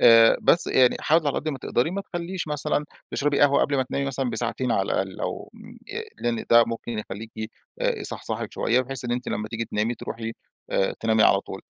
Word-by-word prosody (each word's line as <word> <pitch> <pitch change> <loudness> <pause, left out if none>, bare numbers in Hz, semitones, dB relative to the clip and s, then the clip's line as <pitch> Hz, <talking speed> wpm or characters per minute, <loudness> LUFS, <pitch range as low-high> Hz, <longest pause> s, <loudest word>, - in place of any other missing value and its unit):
آآ 115 -1 +8
بس 170 - +4
يعني 125 -1 +4
حاولي 155 -1 +3
على - - 0
قد 155 - -4
ما 140 - -3
تقدري 125 +4 0
ما 195 +2 -2
تخلّيش 175 -2 -5
مثلًا 150 0 0 0.3
تشربي 145 0 +1
قهوة 140 -1 +5
قبل 145 -1 +1
ما 130 - +3
تنامي 140 +2 -2
مثلًا 135 -2 -1
بساعتين 120 +2 -1
على 95 - +2
الأقل، 95 -1 -2
أو - - -4
م - - -13 0.2
ي - - -4 0.2
لإن 120 -1 -1
ده 115 0 +8
ممكن 115 -1 -4
يخلّيكِ 110 +1 -6 0.3
يصحصحِك - - -2
شوية، 125 +2 +2
بحيث 130 0 -4
إن 120 - -1
أنتِ 125 +1 -2
لمّا 105 +1 -3
تيجي 115 0 -3
تنامي 110 +2 -1
تروحي 115 0 -5 0.4
آآ 95 - +1
تنامي 110 -1 +3
على 100 - +5
طول، - - -8
120 Hz, 205 wpm, -25 LUFS, 115-140 Hz, 0.4 s, آآ